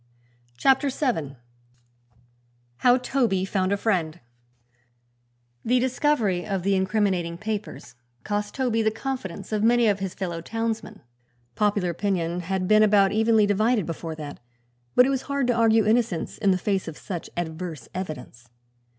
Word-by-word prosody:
CHAPTER 270 Hz, -, +3 dB
VII 215 Hz, -, -2 dB, 1.4 s
HOW 245 Hz, 0 st, +5 dB
TOBY 240 Hz, -7 st, 0 dB
FOUND 190 Hz, -1 st, 0 dB
A 200 Hz, -, +2 dB
FRIEND 175 Hz, -7 st, -1 dB, 1.4 s
The 250 Hz, +2 st, +2 dB
discovery 245 Hz, -8 st, +1 dB
of 195 Hz, -2 st, -3 dB
the 200 Hz, +1 st, +2 dB
incriminating 190 Hz, -3 st, 0 dB
papers 215 Hz, +2 st, -5 dB, 0.3 s
cost 205 Hz, 0 st, -3 dB
Toby 245 Hz, -4 st, +1 dB
the 220 Hz, -, +3 dB
confidence 225 Hz, -6 st, -5 dB
of 215 Hz, -1 st, 0 dB
many 235 Hz, +1 st, +4 dB
of 200 Hz, -2 st, +2 dB
his 190 Hz, -2 st, -4 dB
fellow 175 Hz, -3 st, -4 dB
townsmen. 225 Hz, +4 st, -4 dB, 0.5 s
Popular 205 Hz, -, +1 dB
opinion 175 Hz, -2 st, -1 dB
had 185 Hz, +1 st, -2 dB
been 215 Hz, +1 st, +5 dB
about 200 Hz, -2 st, +5 dB
evenly 220 Hz, 0 st, +3 dB
divided, 215 Hz, +1 st, +2 dB
before 165 Hz, 0 st, -5 dB
that, 150 Hz, -2 st, -8 dB, 0.6 s
but 250 Hz, -, +7 dB
it -, -, +1 dB
was 270 Hz, -1 st, 0 dB
hard 280 Hz, -2 st, 0 dB
to 245 Hz, -, +2 dB
argue 225 Hz, -1 st, +4 dB
innocence 215 Hz, -6 st, 0 dB
in 200 Hz, -, +2 dB
the 185 Hz, -, +3 dB
face 195 Hz, 0 st, -1 dB
of 160 Hz, -, -7 dB
such 180 Hz, -5 st, -6 dB
adverse 165 Hz, -3 st, -5 dB
evidence. 140 Hz, -9 st, -7 dB
205 Hz, 145 wpm, -25 LUFS, 180-225 Hz, 1.4 s, but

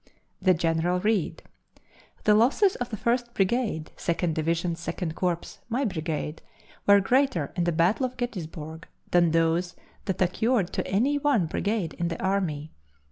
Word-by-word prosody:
The 185 Hz, -1 st, +4 dB
General 165 Hz, +2 st, +1 dB
read: 210 Hz, -3 st, 0 dB, 0.8 s
"The 210 Hz, -, +5 dB
losses 270 Hz, -, +4 dB
of 245 Hz, -, -3 dB
the 215 Hz, -, -4 dB
First 240 Hz, +2 st, 0 dB
Brigade, 195 Hz, -6 st, 0 dB
Second 170 Hz, -1 st, 0 dB
Division, 165 Hz, +2 st, 0 dB
Second 170 Hz, 0 st, -4 dB
Corps 175 Hz, 0 st, -2 dB
my 255 Hz, +4 st, 0 dB
brigade 160 Hz, -5 st, -3 dB, 0.5 s
were 200 Hz, 0 st, +8 dB
greater 200 Hz, -, +1 dB
in 175 Hz, -2 st, 0 dB
the 175 Hz, -, +2 dB
battle 180 Hz, -, +2 dB
of 255 Hz, -, -14 dB
Gettysburg 160 Hz, -9 st, -5 dB, 0.2 s
than 175 Hz, -1 st, +5 dB
those 165 Hz, +2 st, +1 dB, 0.3 s
that 190 Hz, -, -2 dB
occurred 195 Hz, +2 st, +1 dB
to -, -, -2 dB
any 265 Hz, +9 st, +2 dB
one 280 Hz, -, +2 dB
brigade 200 Hz, +1 st, -1 dB
in 170 Hz, -, 0 dB
the 165 Hz, -, -4 dB
army. 175 Hz, -6 st, -1 dB
180 Hz, 150 wpm, -26 LUFS, 165-225 Hz, 0.8 s, were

